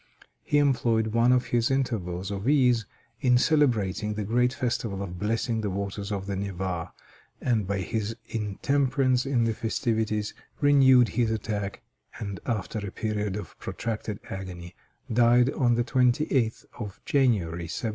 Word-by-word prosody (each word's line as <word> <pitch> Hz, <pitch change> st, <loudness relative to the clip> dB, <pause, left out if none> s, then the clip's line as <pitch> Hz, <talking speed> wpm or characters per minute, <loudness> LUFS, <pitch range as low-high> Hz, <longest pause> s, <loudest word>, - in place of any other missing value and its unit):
He 145 Hz, -, +1 dB
employed 115 Hz, -6 st, +2 dB
one 115 Hz, +2 st, +4 dB
of 125 Hz, 0 st, +3 dB
his 120 Hz, -1 st, +2 dB
intervals 100 Hz, -9 st, -1 dB
of 100 Hz, +5 st, -2 dB
ease 125 Hz, -7 st, +3 dB, 0.3 s
in 125 Hz, -1 st, +4 dB
celebrating 110 Hz, -, +2 dB
the 105 Hz, -, -2 dB
great 125 Hz, +4 st, +2 dB
festival 115 Hz, -6 st, -2 dB
of 90 Hz, -2 st, -7 dB
blessing 115 Hz, +2 st, 0 dB
the 105 Hz, -, -1 dB
waters 100 Hz, +1 st, -4 dB
of 100 Hz, -1 st, -3 dB
the 100 Hz, 0 st, -3 dB
Neva, 95 Hz, -3 st, -3 dB, 0.5 s
and 110 Hz, -6 st, 0 dB
by 100 Hz, -1 st, -1 dB
his 110 Hz, +4 st, -2 dB
intemperance 130 Hz, +4 st, 0 dB
in 125 Hz, -4 st, +2 dB
the 115 Hz, -1 st, +1 dB
festivities 110 Hz, -2 st, -1 dB, 0.3 s
renewed 130 Hz, -5 st, +6 dB
his 120 Hz, +2 st, +1 dB
attack, 105 Hz, -2 st, -3 dB, 0.3 s
and 100 Hz, -3 st, -5 dB
after 110 Hz, -2 st, -2 dB
a 100 Hz, -1 st, -5 dB
period 105 Hz, -2 st, -2 dB
of 105 Hz, -6 st, -7 dB
protracted 110 Hz, -2 st, -4 dB
agony, 90 Hz, -2 st, -7 dB, 0.4 s
died 120 Hz, +2 st, +5 dB
on 120 Hz, -2 st, +2 dB
the 120 Hz, -, +1 dB
28th 125 Hz, -1 st, +1 dB
of 105 Hz, -5 st, -6 dB
January, 95 Hz, -, +1 dB
1725. 115 Hz, -, -2 dB
110 Hz, 145 wpm, -27 LUFS, 100-125 Hz, 0.5 s, renewed